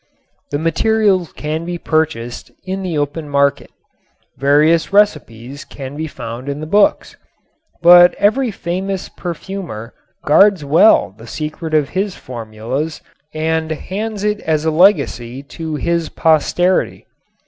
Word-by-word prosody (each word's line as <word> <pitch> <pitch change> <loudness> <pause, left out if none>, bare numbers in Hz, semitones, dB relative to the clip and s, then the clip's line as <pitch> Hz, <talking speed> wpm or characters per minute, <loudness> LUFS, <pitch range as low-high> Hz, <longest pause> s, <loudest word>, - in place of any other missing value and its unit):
The 145 - -1
materials 190 +2 +1
can 155 +2 -4
be 175 0 -4
purchased 155 -8 -2
in 190 +1 -4
the 180 -4 -3
open 145 +1 -3
market. 140 -1 +1 0.7
Various 150 +6 +3
recipes 145 - 0
can 135 0 -9
be 160 +1 -4
found 120 -1 -7
in 140 +1 -4
the 155 - -5
books. 210 - +2 0.7
But 175 +1 +8
every 225 +6 +1
famous 190 0 -4
perfumer 170 - -7 0.3
guards 185 +1 +4
well 160 - +4
the 115 +2 -14
secret 155 +4 -4
of 150 -3 +2
his 195 0 -2
formulas 120 +6 -5 0.3
and 160 0 -1
hands 205 +6 -4
it 210 0 0
as 155 -1 -1
a 160 - +2
legacy 140 - +2
to 160 +2 -6
his 170 +1 -1
posterity. 170 +3 +1
160 Hz, 125 wpm, -17 LUFS, 145-185 Hz, 0.7 s, But